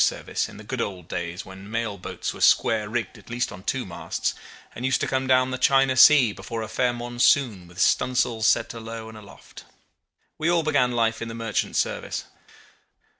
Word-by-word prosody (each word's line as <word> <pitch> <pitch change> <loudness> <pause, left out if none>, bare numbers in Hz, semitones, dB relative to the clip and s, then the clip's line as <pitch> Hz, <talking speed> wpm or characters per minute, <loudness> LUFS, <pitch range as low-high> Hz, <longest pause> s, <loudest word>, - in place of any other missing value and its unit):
service - - -1
in - - -12
the - - -11
good - - -4
old 90 -5 -5
days 85 +3 -5
when 95 +2 -11
mail 115 -2 -2
boats 90 - -5
were - - -11
square 105 -2 +3
rigged 115 -3 -3
at - - -18
least 120 +1 -2
on 90 - -10
two - - -2
masts, - - -3 0.4
and 120 - -8
used 130 0 +2
to - - 0
come 130 0 -1
down 130 0 +3
the 130 - -3
China 135 -1 +4
Sea 130 -4 +7
before 110 +4 -6
a - - -5
fair 125 +3 +1
monsoon 120 -4 +1
with 85 +2 -13
stun' 125 - +2
sails 115 -3 +1
set 115 - +2
alow 115 -1 -7
and 110 - -11
aloft. 100 -1 -14 0.8
We 160 +2 +1
all 170 -1 +2
began 125 -5 +2
life 115 -1 0
in 115 - -4
the 115 - -7
merchant 115 -2 -2
service. - - -2
115 Hz, 200 wpm, -24 LUFS, 105-125 Hz, 0.8 s, Sea